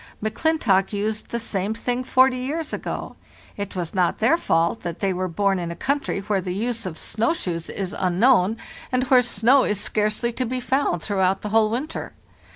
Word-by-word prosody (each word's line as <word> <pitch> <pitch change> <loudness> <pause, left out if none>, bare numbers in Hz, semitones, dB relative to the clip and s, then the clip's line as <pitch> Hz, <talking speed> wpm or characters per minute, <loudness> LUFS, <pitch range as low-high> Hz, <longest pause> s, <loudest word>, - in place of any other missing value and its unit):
M'Clintock 220 -4 +1
used 210 +1 -2
the 235 - -2
same 210 -1 -2
thing 245 +2 -2
forty 260 0 +4
years 295 +5 -3
ago. - - -5 0.4
It 200 -1 -5
was 175 -3 -3
not 180 -2 +1
their 235 +9 +4
fault 170 - +1
that 170 -1 -5
they 195 -2 0
were 185 +1 -2
born 195 +2 +1
in 170 -1 -3
a 170 - -5
country 275 -1 -1
where 200 -1 0
the 180 0 -4
use 230 0 -2
of 165 -3 -6
snow 225 - 0
shoes 170 - -4
is 190 -2 -4
unknown, 195 +3 +3 0.3
and 255 0 +2
where 255 -1 +8
snow 250 +2 +4
is 205 -2 0
scarcely 215 +3 0
to 255 - -2
be 255 +2 -2
found 250 - 0
throughout 190 -2 +1
the 210 - -4
whole 220 0 +3
winter. 265 +8 -4
215 Hz, 190 wpm, -23 LUFS, 190-250 Hz, 0.4 s, where